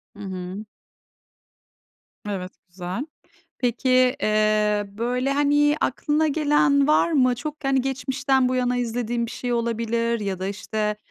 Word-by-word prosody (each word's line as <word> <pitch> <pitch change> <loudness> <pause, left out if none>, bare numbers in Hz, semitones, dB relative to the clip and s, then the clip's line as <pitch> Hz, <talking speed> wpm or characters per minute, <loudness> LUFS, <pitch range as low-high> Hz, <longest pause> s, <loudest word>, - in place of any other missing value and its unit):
Hı - - -15
hı. 190 +2 -6 1.6
Evet, 185 -2 -4 0.2
güzel. 180 +8 -5 0.5
Peki, 245 +1 -1 0.3
eee, 215 -1 +2
böyle 245 +6 -1
hani 290 +1 +3
aklına 300 +4 +1
gelen 290 -2 +3
var 310 +2 +3
mı? 255 -4 +3
Çok 300 +4 -6
hani 270 -1 +2
geçmişten 265 0 0
bu 255 - -1
yana 250 0 +1
izlediğin 235 0 -1
bir - - -8
şey 245 -1 -4
olabilir 230 0 -1
ya 195 -3 -3
da 190 - -2
işte, 210 +1 -2
240 Hz, 130 wpm, -23 LUFS, 215-270 Hz, 1.6 s, hani